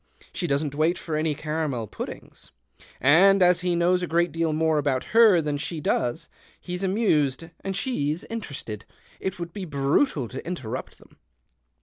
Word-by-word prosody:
She 175 Hz, -, -2 dB
doesn't 140 Hz, 0 st, 0 dB
wait 160 Hz, +4 st, +1 dB
for 160 Hz, -, -4 dB
any 155 Hz, -1 st, 0 dB
caramel 150 Hz, -6 st, -2 dB
puddings. -, -, -8 dB, 0.5 s
And 185 Hz, +8 st, +6 dB
as 180 Hz, -1 st, +5 dB
he 180 Hz, -1 st, 0 dB
knows 180 Hz, +1 st, +2 dB
a 180 Hz, -, -2 dB
great 170 Hz, +1 st, +1 dB
deal 165 Hz, -1 st, 0 dB
more 160 Hz, 0 st, +2 dB
about 135 Hz, -3 st, 0 dB
her 220 Hz, -7 st, +7 dB
than 150 Hz, -1 st, -1 dB
she 165 Hz, +2 st, -4 dB
does, 120 Hz, -4 st, -1 dB, 0.3 s
he's 180 Hz, 0 st, -5 dB
amused 165 Hz, -, +1 dB
and 195 Hz, 0 st, -3 dB
she's 175 Hz, -, -1 dB
interested. 140 Hz, -, -6 dB, 0.4 s
It 190 Hz, 0 st, -3 dB
would 170 Hz, -1 st, -6 dB
be 200 Hz, -3 st, -5 dB
brutal 140 Hz, -, +1 dB
to 130 Hz, -, -7 dB
interrupt 130 Hz, -8 st, -5 dB
them." -, -, -21 dB
160 Hz, 160 wpm, -25 LUFS, 145-180 Hz, 0.5 s, her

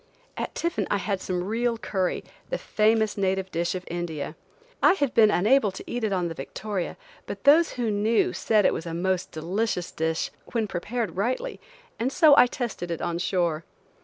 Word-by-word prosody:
At -, -, -4 dB
tiffin 340 Hz, 0 st, -1 dB
I 205 Hz, -, +2 dB
had 195 Hz, -1 st, -2 dB
some 180 Hz, -1 st, -2 dB
real 230 Hz, +4 st, 0 dB
curry, 190 Hz, -4 st, -1 dB, 0.3 s
the -, -, -1 dB
famous 220 Hz, -, +1 dB
native 190 Hz, -1 st, 0 dB
dish 170 Hz, +2 st, -1 dB
of 180 Hz, -, -4 dB
India. 165 Hz, -3 st, -4 dB, 0.5 s
I -, -, +7 dB
had 285 Hz, -9 st, 0 dB
been 215 Hz, -2 st, +6 dB
unable 215 Hz, +3 st, +3 dB
to -, -, -8 dB
eat 245 Hz, -1 st, -4 dB
it 215 Hz, -, +1 dB
on 180 Hz, -3 st, 0 dB
the 165 Hz, -, -4 dB
Victoria, 185 Hz, +6 st, -4 dB, 0.3 s
but -, -, -6 dB
those 315 Hz, +4 st, +6 dB
who 240 Hz, -3 st, -1 dB
knew 215 Hz, +3 st, +2 dB
said 215 Hz, -3 st, +2 dB
it -, -, +4 dB
was 165 Hz, -, -5 dB
a 165 Hz, -, -4 dB
most 185 Hz, +1 st, -1 dB
delicious 180 Hz, +3 st, -2 dB
dish 160 Hz, 0 st, -1 dB, 0.2 s
when 230 Hz, -2 st, +1 dB
prepared 210 Hz, +4 st, -3 dB
rightly 255 Hz, -, -1 dB, 0.4 s
and 245 Hz, +4 st, 0 dB
so 310 Hz, -2 st, +6 dB
I 250 Hz, -, +7 dB
tested 235 Hz, -9 st, -4 dB
it 170 Hz, -, -3 dB
on 170 Hz, 0 st, -1 dB
shore. 170 Hz, -3 st, 0 dB
205 Hz, 190 wpm, -26 LUFS, 175-235 Hz, 0.5 s, I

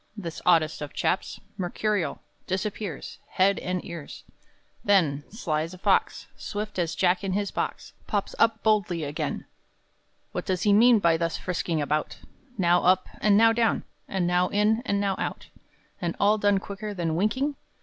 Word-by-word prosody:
This 170 Hz, -5 st, -6 dB
oddest 160 Hz, -4 st, +3 dB
of 145 Hz, -1 st, -6 dB
chaps, 185 Hz, -, -1 dB, 0.2 s
Mercurial, 195 Hz, +1 st, -1 dB, 0.2 s
Disappears 190 Hz, -3 st, -4 dB
Head 195 Hz, +1 st, +3 dB
and 180 Hz, -1 st, -3 dB
ears! 170 Hz, -4 st, -8 dB, 0.6 s
Then, 160 Hz, -8 st, +3 dB
sly 165 Hz, -8 st, -2 dB
as 165 Hz, +3 st, -5 dB
a -, -, -12 dB
fox, -, -, +1 dB
Swift 210 Hz, -1 st, -5 dB
as 170 Hz, -2 st, -1 dB
Jack 180 Hz, +1 st, +2 dB
in 195 Hz, -1 st, -1 dB
his 200 Hz, 0 st, -1 dB
box, -, -, -4 dB
Pops 205 Hz, -2 st, -1 dB
up 225 Hz, -1 st, +3 dB
boldly 200 Hz, -7 st, +2 dB
again! 145 Hz, +1 st, -3 dB, 0.9 s
What -, -, -4 dB
does 185 Hz, -3 st, 0 dB
he 205 Hz, -, +4 dB
mean 235 Hz, +3 st, +7 dB
by 170 Hz, -5 st, +3 dB
thus 165 Hz, 0 st, -1 dB
frisking 170 Hz, -3 st, -2 dB
about, 150 Hz, +2 st, -1 dB, 0.4 s
Now 175 Hz, -2 st, +3 dB
up 185 Hz, +1 st, +3 dB
and 205 Hz, -1 st, +5 dB
now 225 Hz, +1 st, +6 dB
down, 225 Hz, -1 st, +1 dB, 0.2 s
and 190 Hz, -2 st, -1 dB
now 180 Hz, +1 st, +2 dB
in 210 Hz, +3 st, +2 dB
and 200 Hz, -, +1 dB
now 195 Hz, -1 st, 0 dB
out, -, -, -4 dB, 0.5 s
And 170 Hz, -2 st, -2 dB
all 210 Hz, +2 st, +4 dB
done 205 Hz, -1 st, +3 dB
quicker 205 Hz, +2 st, -6 dB
than 165 Hz, -3 st, -1 dB
winking? 260 Hz, -, 0 dB
190 Hz, 165 wpm, -26 LUFS, 170-210 Hz, 0.9 s, mean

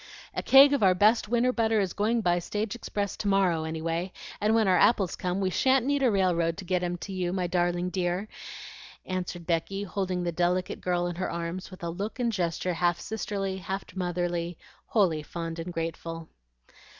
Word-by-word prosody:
"A -, -, -2 dB
keg 275 Hz, +1 st, +7 dB
of 280 Hz, -, +1 dB
our 185 Hz, -2 st, +5 dB
best 215 Hz, +3 st, +3 dB
winter 245 Hz, +2 st, +2 dB
butter 225 Hz, -2 st, +2 dB
is 190 Hz, -4 st, 0 dB
going 225 Hz, +3 st, +1 dB
by 175 Hz, -3 st, +2 dB
stage 210 Hz, +4 st, -3 dB
express 205 Hz, -4 st, -3 dB
to 205 Hz, -, -3 dB
morrow 185 Hz, -5 st, +2 dB
anyway; 165 Hz, +3 st, -2 dB, 0.3 s
and 215 Hz, +2 st, +3 dB
when 220 Hz, -3 st, +3 dB
our 185 Hz, -1 st, +4 dB
apples 195 Hz, -6 st, +3 dB
come, 180 Hz, +1 st, -2 dB
we 190 Hz, -1 st, 0 dB
shan't 260 Hz, +4 st, +3 dB
need 285 Hz, 0 st, +1 dB
a 260 Hz, -, +4 dB
railroad 175 Hz, -5 st, +1 dB
to 195 Hz, -, -7 dB
get 180 Hz, 0 st, 0 dB
'em 175 Hz, 0 st, -2 dB
to 195 Hz, -, -7 dB
you, 180 Hz, -2 st, -1 dB
my 185 Hz, -1 st, -1 dB
darling 175 Hz, 0 st, 0 dB
dear," 180 Hz, +2 st, -1 dB, 0.8 s
answered 180 Hz, -2 st, -4 dB
Becky, 180 Hz, +4 st, -1 dB
holding 185 Hz, -2 st, -2 dB
the 175 Hz, -, -1 dB
delicate 180 Hz, +2 st, 0 dB
girl 175 Hz, -1 st, 0 dB
in 175 Hz, -1 st, -3 dB
her 185 Hz, -, -2 dB
arms 170 Hz, +2 st, -4 dB
with 185 Hz, -2 st, -12 dB
a 170 Hz, -, -2 dB
look 200 Hz, +7 st, -5 dB
and 240 Hz, -2 st, 0 dB
gesture 180 Hz, -2 st, -1 dB
half 175 Hz, 0 st, +1 dB
sisterly, 195 Hz, -2 st, -3 dB
half 190 Hz, +2 st, -5 dB
motherly, 175 Hz, -2 st, -2 dB, 0.3 s
wholly 180 Hz, -8 st, +2 dB
fond 165 Hz, +1 st, -6 dB
and 170 Hz, +2 st, -5 dB
grateful. 165 Hz, 0 st, -5 dB
185 Hz, 195 wpm, -28 LUFS, 175-205 Hz, 0.8 s, keg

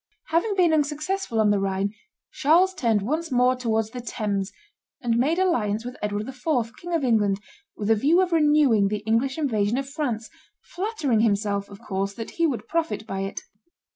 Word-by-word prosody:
Having 370 Hz, +6 st, +1 dB
been 350 Hz, -4 st, +4 dB
unsuccessful 305 Hz, -, -1 dB
on 210 Hz, -1 st, +4 dB
the 205 Hz, -, +2 dB
Rhine, 195 Hz, +1 st, -1 dB, 0.4 s
Charles 350 Hz, +6 st, +3 dB
turned 230 Hz, -, +1 dB
once 310 Hz, +7 st, -2 dB
more 250 Hz, 0 st, +3 dB
towards 225 Hz, -3 st, -1 dB
the 250 Hz, 0 st, -6 dB
Thames, 210 Hz, -4 st, -2 dB, 0.5 s
and 240 Hz, -4 st, 0 dB
made 280 Hz, +8 st, +2 dB
alliance 230 Hz, -, +1 dB
with 250 Hz, +1 st, -6 dB
Edward 210 Hz, 0 st, -2 dB
IV., 250 Hz, -3 st, -2 dB
King 350 Hz, 0 st, -4 dB
of 320 Hz, -, 0 dB
England, 210 Hz, -5 st, +2 dB, 0.4 s
with 210 Hz, +1 st, 0 dB
a -, -, +6 dB
view 295 Hz, -, +3 dB
of 370 Hz, -1 st, +2 dB
renewing 295 Hz, -10 st, +4 dB
the 210 Hz, +1 st, -3 dB
English 235 Hz, +5 st, +1 dB
invasion 225 Hz, -7 st, 0 dB
of 275 Hz, 0 st, -2 dB
France, 250 Hz, -7 st, -3 dB, 0.3 s
flattering 350 Hz, -, -1 dB
himself, 200 Hz, -2 st, +1 dB
of 200 Hz, -1 st, -11 dB
course, 195 Hz, +1 st, -3 dB
that 225 Hz, -, -6 dB
he 335 Hz, -1 st, +1 dB
would 260 Hz, -6 st, -3 dB
profit 325 Hz, -9 st, -1 dB
by 195 Hz, -3 st, -4 dB
it. 195 Hz, 0 st, -4 dB
245 Hz, 180 wpm, -25 LUFS, 210-310 Hz, 0.5 s, a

